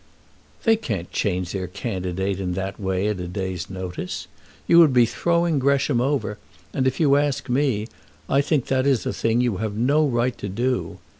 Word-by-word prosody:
"They 225 -1 +4
can't 100 - -4
change 90 -3 -1
their 95 -2 -3
candidate 95 -1 -3
in 90 -2 -2
that 95 +1 -4
way 95 0 0
at 105 -3 -2
a 90 - -4
day's 95 -1 -4
notice. 90 -1 -5 0.4
You 170 - +6
would 155 -5 +6
be 120 -1 +6
throwing 170 +4 +1
Gresham 140 -2 +2
over, 130 -6 -1 0.3
and, 130 -2 +1
if 130 - -1
you 140 -3 +5
ask 145 -2 0
me, 125 -5 +1 0.4
I 140 - +3
think 145 -3 0
that 130 0 +1
is 135 -5 +2
a - - -1
thing 115 +1 +1
you 120 -6 0
have 110 0 -3
no 145 +7 +3
right 120 -1 0
to 100 - -4
do. 120 +6 -1
120 Hz, 190 wpm, -23 LUFS, 95-140 Hz, 0.4 s, You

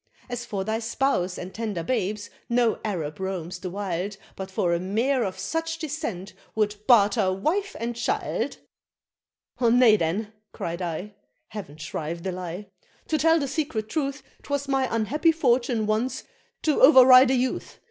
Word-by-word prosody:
As 240 0 -4
for 195 -4 -2
thy 220 +2 -1
spouse 225 -6 0
and 180 +1 -7
tender 210 -6 -3
babes, 210 -1 -2 0.2
no 235 -1 +2
Arab 165 -7 -3
roams 185 -2 -4
the 180 - -5
wild 195 0 -3 0.2
But 190 0 -6
for 180 -2 0
a 170 - +1
mare 230 +8 +1
of 190 -3 -3
such 325 0 -2
descent, 290 - -5 0.2
would 210 -1 +1
barter 210 -4 +5
wife 350 - -1
and 235 +1 -3
child." 235 - -2 1.0
"Nay 235 -2 +6
then," 200 +6 -2 0.2
cried 170 +2 -4
I 180 +4 -4 0.4
(heav'n 195 -9 -8
shrive 155 +2 -5
the 190 - -2
lie!) 180 +2 -6 0.4
"to 310 - +1
tell 325 +3 +5
the 280 - -1
secret 260 -8 -2
truth, 280 +1 -2 0.2
'Twas 285 -1 -3
my 270 -1 +1
unhappy 250 - +2
fortune 245 -7 +1
once 220 +5 -1 0.4
to 305 -2 +2
over 260 -2 +9
ride 255 0 +8
a 265 - +3
youth! 255 0 -2
220 Hz, 155 wpm, -25 LUFS, 185-260 Hz, 1.0 s, over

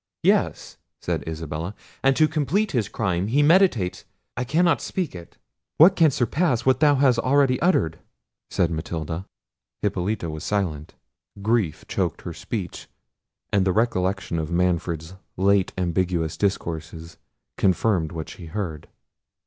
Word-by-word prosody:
"Yes," - - +1 0.2
said - - -2
Isabella; 80 +4 -5 0.3
"and 135 0 +4
to 155 +2 +4
complete 160 +7 0
his 120 -6 0
crime, 95 -3 -1
he 140 +6 +3
meditates—I 145 - +1
cannot 165 +7 +2
speak 180 -5 -3
it!" 85 -2 -11 0.4
"What 175 +5 +7
can 165 -2 +5
surpass 125 0 0
what 130 0 +3
thou 145 -1 +5
hast 130 -3 +3
already 130 +1 +2
uttered?" 145 - +2 0.5
said 85 - +1
Matilda. 80 +2 -4 0.6
Hippolita 100 -1 -1
was 80 -1 -6
silent. 85 -8 -2 0.5
Grief 110 -7 0
choked 85 -3 -2
her 85 - -5
speech; 90 +3 -5 0.7
and 100 -2 +4
the 95 -1 +1
recollection 100 -5 0
of 80 0 -3
Manfred's 85 -1 -1 0.2
late 95 0 +3
ambiguous 85 -2 0
discourses 85 -4 -3 0.4
confirmed 95 -3 +2
what 80 -2 -5
she 85 - -10
heard. 80 -4 -5
95 Hz, 130 wpm, -24 LUFS, 85-130 Hz, 0.7 s, What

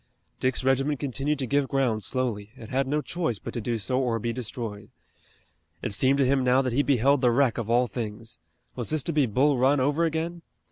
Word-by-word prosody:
Dick's 130 0 0
regiment 135 +2 +1
continued 145 +2 -1
to 135 - -2
give 140 +2 +1
ground 130 -6 0
slowly. 110 -4 -2
It 110 - -10
had 135 +1 0
no 150 +2 0
choice 165 - -2
but - - -8
to 120 - -3
do 115 +1 -1
so 125 +5 0
or 120 -3 0
be 115 +1 -2
destroyed. 115 -4 -6 0.9
It - - -2
seemed 130 +6 +3
to 140 - +3
him 135 0 +2
now 130 +2 +3
that 130 -2 -1
he 140 - +3
beheld 140 0 +3
the 125 - +4
wreck 125 0 +2
of 115 -1 -4
all 120 +2 +4
things. 110 -2 -5 0.4
Was 120 -3 -3
this 155 -3 +1
to 170 - -2
be 145 -4 +3
Bull 130 +5 +2
Run 135 +3 +4
over 145 +5 +1
again? 165 +1 -2
130 Hz, 220 wpm, -26 LUFS, 115-140 Hz, 0.9 s, the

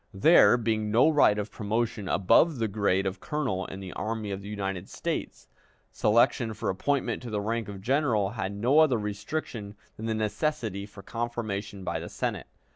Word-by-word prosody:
There 140 - +6
being 110 -2 -1
no 120 +8 +5
right 145 -9 +4
of 105 0 -3
promotion 110 -2 -2
above 130 - +4
the 115 -1 0
grade 100 -2 +1
of 95 0 -3
colonel 125 -12 -2
in 95 - -8
the 95 -2 -7
Army 110 -1 -3
of 100 0 -4
the 100 - -8
United 95 -3 -4
States, - - -4 0.4
selection 115 +1 +2
for 105 - -1
appointment 140 +9 -1
to 125 - -7
the 105 -2 -1
rank 115 +2 -2
of 100 -1 -8
general 120 -6 +1
had 100 -4 -3
no 120 +9 +3
other 150 -6 +5
restriction 105 +1 -4 0.2
than 110 - -5
the 110 - 0
necessity 110 -2 -2
for 100 -1 -13
confirmation 110 -4 -4
by - - -2
the - - -7
Senate. - - -3
110 Hz, 180 wpm, -28 LUFS, 100-120 Hz, 0.4 s, There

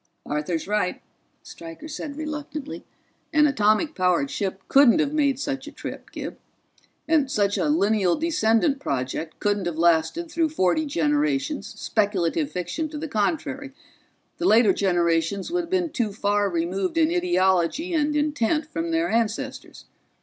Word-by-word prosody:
"Arthur's 150 +4 -2
right," 205 -3 0 0.4
Stryker 165 - -10
said 295 -1 -6
reluctantly. 300 -1 -6 0.5
"An 305 -2 +5
atomic 240 +3 +2
powered 180 - +1
ship 190 -1 -3
couldn't 275 -2 +6
have 295 -1 +1
made 280 -4 +1
such 275 -1 -3
a - - -7
trip, - - -8
Gib. - - -7 0.7
And 310 -4 +2
such 205 -5 +1
a 300 - 0
lineal 210 - +2
descendant 290 -4 +1
project 140 - -3
couldn't 205 -3 0
have 170 -2 -3
lasted 170 - +2
through 330 -2 +1
forty 300 - +1
generations, 295 0 0
speculative 175 -8 0
fiction 180 - -3
to 300 - -7
the 315 +2 -4
contrary 275 +4 -2 0.7
the 345 - +1
later 220 -3 +5
generations 175 - 0
would 350 -1 0
have - - -17
been 355 -3 0
too 235 -7 -1
far 205 0 +1
removed 180 - -2
in 320 0 +3
ideology 325 - +1
and 300 -2 +1
intent 295 0 +1
from 330 +1 -3
their 330 +1 +1
ancestors. 225 -1 -2
260 Hz, 145 wpm, -24 LUFS, 190-305 Hz, 0.7 s, couldn't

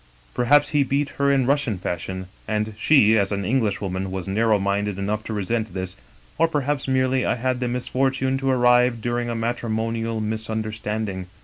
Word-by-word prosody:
" - - -30
Perhaps 145 +4 +4
he 150 -2 +2
beat 140 +1 0
her 140 0 +3
in 135 -2 +2
Russian 135 -6 +1
fashion^ 95 +1 -4 0.2
and 105 0 -1
she, 110 -5 +5
as 100 0 0
an 100 -1 -2
Englishwoman, 100 -5 -1
was 95 -1 -5
narrow 110 +2 +2
minded 100 0 -1
enough 105 +2 -2
to - - -5
resent 105 0 -2
this; 95 -1 -4 0.4
or 165 - +5
perhaps, 145 -3 -1
merely, 130 -1 +2
I - - +1
had 125 +1 -1
the 125 - -1
misfortune 130 +2 0
to 135 0 -1
arrive 125 -1 +4
during 120 +1 -2
a 120 - -2
matrimonial 115 -1 -2
misunderstanding. 110 -2 -2
115 Hz, 175 wpm, -23 LUFS, 105-130 Hz, 0.4 s, she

